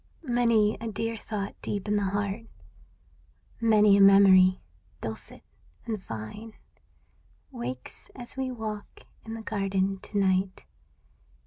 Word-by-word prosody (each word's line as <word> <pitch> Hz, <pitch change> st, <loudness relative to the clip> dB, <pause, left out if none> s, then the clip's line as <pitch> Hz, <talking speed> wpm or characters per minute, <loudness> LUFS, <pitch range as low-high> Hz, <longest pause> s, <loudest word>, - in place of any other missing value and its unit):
K)i5 -, -, -8 dB
Many 230 Hz, -3 st, +3 dB
a 230 Hz, -, -4 dB
dear 225 Hz, +1 st, -2 dB
thought 210 Hz, -2 st, -5 dB
deep 205 Hz, 0 st, -3 dB
in 210 Hz, -, +1 dB
the 205 Hz, -1 st, +1 dB
heart, 200 Hz, +3 st, -2 dB, 1.1 s
Many 215 Hz, -3 st, +5 dB
a -, -, +5 dB
memory, 190 Hz, -2 st, +7 dB, 0.4 s
dulcet 110 Hz, -1 st, -7 dB, 0.4 s
and 215 Hz, -4 st, -3 dB
fine. 185 Hz, -, -8 dB, 1.0 s
Wakes 130 Hz, -, -7 dB
as 245 Hz, 0 st, -7 dB
we 265 Hz, -1 st, -2 dB
walk 220 Hz, -4 st, -6 dB, 0.2 s
in 225 Hz, 0 st, -6 dB
the 225 Hz, -, -7 dB
garden 195 Hz, -2 st, -1 dB
to 205 Hz, -, -5 dB
night. 190 Hz, -1 st, +1 dB
205 Hz, 125 wpm, -27 LUFS, 195-225 Hz, 1.1 s, memory